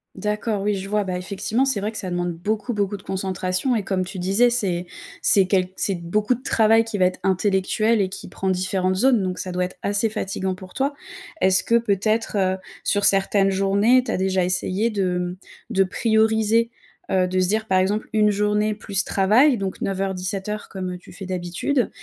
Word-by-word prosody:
D'accord. 210 0 -2
Oui, 205 0 0
je 195 0 -5
vois, 210 0 +1
bah, 180 -1 -2
effectivement, 205 +7 -1
c'est 265 -7 0
vrai 210 +2 -2
que 215 - -8
ça 185 -2 -5
demande 175 -1 -1
beaucoup, 210 +7 -3
beaucoup 205 -1 -1
de - - -15
concentration 190 +5 -1
et 210 - -1
comme 185 -1 -1
tu 190 0 -7
disais, 200 +7 +3
c'est 185 -7 -1 0.4
c'est 195 -2 +5
quelque 185 -1 +1
c'est 195 - -1
beaucoup 210 +8 0
de 255 - -14
travail 225 0 +4
qui 220 -3 -5
va 185 - +5
être 185 - -1
intellectuel 200 +3 +1
et 190 -2 +1
qui - - -8
prend 190 +1 -2
différentes 185 0 0
zones, 240 -1 +3
donc 185 -1 -3
ça 185 - -4
doit 180 0 0
être 180 - -9
assez 205 +2 +1
fatigant 190 -3 -3
pour 185 0 -12
toi. 275 +2 0 0.5
Est-ce 190 0 +5
que 235 0 +3
peut-être, 215 0 0
heu, 190 -1 +1 0.3
sur 205 -1 +1
certaines 195 0 +4
journées, 200 +6 +3
tu - - -4
as - - -1
déjà 190 -1 +1
essayé 190 +4 0
de, 185 -3 0
mmh, 180 +1 -3 0.3
de 195 - +3
prioriser, 220 +2 +2 0.4
heu, 185 -1 +2
de 185 0 -1
se 185 - +2
dire, 220 +2 0
par 185 0 +3
exemple, 205 +3 0
une 210 -1 +4
journée 210 +1 +1
plus 200 -1 0
travail, 230 +8 +3
donc 195 -1 -4
9:00-17:00 195 +2 -3
comme, 185 -1 -5
heu, - - -6
tu - - -16
fais 190 +1 -9
d'habitude 185 +9 -1
195 Hz, 205 wpm, -22 LUFS, 185-215 Hz, 0.5 s, c'est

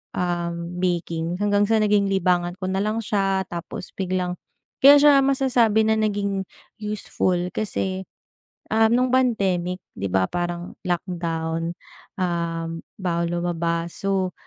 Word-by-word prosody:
um, 175 -1 -2
baking. 170 -1 -1
Hanggang 205 0 +3
sa 225 -1 +4
naging 205 -1 +3
libangan 175 -2 +1
ko 185 - -3
nalang 210 +4 0
siya, 195 -2 +1
tapos 170 +1 -7
biglang 180 -2 -1 0.5
kaya 280 +1 +10
siya 290 0 +7
masasabi 250 -5 +3
na 220 0 +3
naging 200 -2 0 0.4
useful 210 -3 -1 0.2
kasi, 190 -3 -2 0.7
ah, 220 0 +5
nung 250 +2 +3
pandemic, 190 -8 +1 0.2
'di 100 - -3
ba 95 0 +3
parang 175 0 -3
lockdown? 165 -2 -2 0.5
Um, 165 -2 -2 0.2
bawal 170 -2 -1
lumabas, 170 -1 -1
so 190 -2 0
185 Hz, 120 wpm, -23 LUFS, 170-205 Hz, 0.7 s, kaya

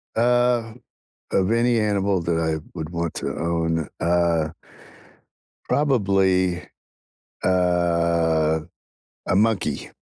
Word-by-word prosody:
Uh, 120 -1 +2 0.6
of 95 +2 +1
any 120 0 +2
animal 100 -3 +1
that 85 -1 -1
I 80 -1 0 0.2
would 80 -1 -5
want 85 -1 -3
to - - -3
own, 80 -1 -1
uh, 85 -2 +1 1.2
probably, 95 -9 +2 0.8
uh, 85 -3 +2 0.7
a 90 - +1
monkey, 105 -8 0
90 Hz, 90 wpm, -23 LUFS, 85-105 Hz, 1.2 s, Uh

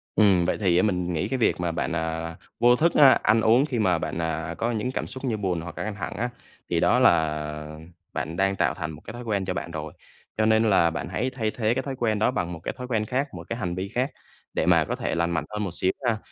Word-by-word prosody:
Ừm, 95 -5 +5
vậy 90 - 0
thì 90 -3 +3
á, 90 - +4
mình 90 -4 0
nghĩ 85 +4 -1
cái 130 +4 -1
việc 115 - +2
mà 85 -1 0
bạn, - - -2
à, 80 0 -3 0.2
vô 120 +1 +6
thức, 165 +6 +2
a, 140 -2 +9
ăn 110 +2 +4
uống 120 +6 +5
khi 130 -6 -2
mà 95 -4 +3
bạn, - - -4
à, 80 0 -3
có 120 - 0
những 115 +2 -2
cảm - - -3
xúc 130 +1 -7
như 115 -4 0
buồn 90 -5 -1
hoặc 85 -1 -8
là - - -3
căng 105 -1 -4
thẳng 100 - -5
á, 120 +3 -1 0.4
thì - - +1
đó - - +4
là 75 -1 +1 0.3
bạn 80 - -3
đang 95 0 +2
tạo - - +1
thành 80 -4 -5
một 75 0 -11
cái - - -7
thói 120 +1 -7
quen 100 -4 -1
cho 90 - -2
bạn 85 - -5
rồi. 80 -1 -6 0.4
Cho 110 - +3
nên 110 0 +4
là 95 -6 +4
bạn 80 -4 -4
hãy 130 - -1
thay 115 -4 -2
thế 110 0 0
cái 130 - -2
thói 135 -2 -4
quen 110 -4 0
đó 110 - +3
bằng 90 -9 -2
một 80 - -7
cái - - -3
thói 125 -1 -6
quen 110 -4 0
khác, 130 +6 -1
một - - -7
cái 115 - -2
hành 90 -6 -3
vi 95 +2 -3
khác 125 +6 -1 0.4
để - - 0
mà - - +4
có - - -2
thể - - -2
lành 85 0 0
mạnh 80 -3 -1
hơn 105 0 -3
một 95 - -3
xíu 95 +1 +1
ha. 115 -3 +2
100 Hz, 285 wpm, -25 LUFS, 85-115 Hz, 0.4 s, a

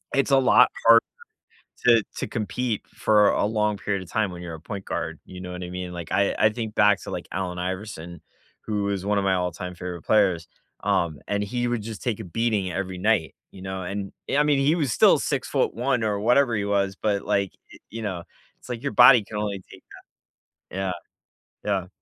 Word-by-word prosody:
it's 140 0 +1
a 135 - +6
lot 125 -1 +6 0.2
harder 115 0 +8 0.8
to 115 -3 +6
to - - -3
compete 115 0 -2
for 105 -1 +4
a - - +1
long 105 -1 0
period 100 -1 -2
of 90 - -15
time 105 -4 0
when 90 - -8
you're 85 -2 -7
a 80 - -8
point 95 +3 -7
guard, 80 -1 -4
you 90 0 -10
know 90 -1 -7
what 90 0 -6
I 90 - -6
mean? 90 0 -5
Like, 85 -2 -7
I 100 - +2
I 110 - +5
think 110 -1 -5
back 105 -1 +4
to, - - -7
like, - - -5
Allen 90 -2 -3
Iverson, 90 -3 -5 0.4
who 105 -2 -1
is 100 -2 -2
one 105 0 +1
of 100 - +1
my 95 - +2
all-time 90 0 -3
favorite 90 -1 -6
players, 95 -6 +2 0.4
um, 80 -4 0
and 100 0 0
he 120 +4 -2
would 120 -3 -1
just 110 0 -7
take 115 -5 -1
a - - -5
beating 100 0 -1
every 95 +1 -4
night, 95 -4 +1 0.2
you 95 - -12
know? 95 0 -5
And, 100 +2 -4 0.2
I 145 - +4
mean, 145 -2 +2
he 145 +4 +3
was 145 -8 0
still - - +5
6'1" 125 +2 0
or 105 -2 0
whatever 120 +3 +3
he 100 -1 -1
was, 100 -1 0
but, 100 -2 0
like, 100 -2 0 0.2
y - - -12
you 115 0 -6
know, 95 -5 -4 0.4
it's - - -16
like 120 0 -5
your 140 - -1
body 120 -2 +8
can 105 +1 -7
only 100 -2 -3
take - - -14 0.9
that. - - -9
Yeah. 95 -1 -1 0.7
Yeah. 95 -3 0
100 Hz, 215 wpm, -25 LUFS, 90-110 Hz, 0.9 s, harder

